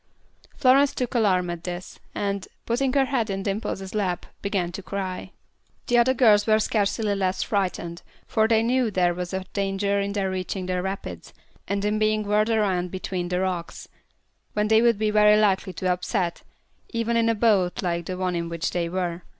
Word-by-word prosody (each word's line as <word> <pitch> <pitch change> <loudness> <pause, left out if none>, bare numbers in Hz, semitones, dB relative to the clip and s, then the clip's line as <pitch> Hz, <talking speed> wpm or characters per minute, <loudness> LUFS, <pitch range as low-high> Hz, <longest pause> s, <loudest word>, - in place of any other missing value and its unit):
Florence 275 +1 +4
took 250 -2 -2
alarm 190 -7 +2
at 170 -1 -7
this, 180 0 -6 0.2
and, 200 -1 -2 0.2
putting 255 +3 +1
her 275 -1 +4
head 250 -5 -1
in 195 0 -2
Dimple's 195 -1 -3
lap, 190 -4 -1 0.2
began 195 -4 -1
to 195 - -6
cry 190 -1 -4
too. 190 - -18 0.5
The 240 - +2
older 250 +2 +4
girls 215 -4 +5
were 215 0 +5
scarcely 210 0 0
less 190 -1 0
frightened, 180 -4 -2 0.2
for 220 0 +2
they 225 -1 +3
knew 245 0 +2
there 180 -3 +2
was 180 0 -5
a 190 0 -3
danger 200 0 0
in 200 0 -2
their 195 -2 -1
reaching 185 0 -3
the 180 0 -1
rapids, 185 - -6 0.3
and 200 0 -1
in 210 +1 +1
being 215 0 +2
whirled 210 +2 +2
around 195 -5 +1
between 185 -1 -4
the 180 0 0
rocks, 180 -3 -4 0.6
when 210 0 0
they 220 0 +5
would 235 -2 +4
be 215 0 +1
very 210 0 +5
likely 195 -2 +1
to 185 0 0
upset, 180 -1 -2 0.5
even 230 0 -1
in 230 0 +3
a 230 - +2
boat 205 -6 +2
like 170 -2 -2
the 185 - -4
one 185 -1 -1
in 170 0 -2
which 170 -1 -2
they 170 -1 -1
were. 175 -1 -2
200 Hz, 190 wpm, -25 LUFS, 180-215 Hz, 0.6 s, girls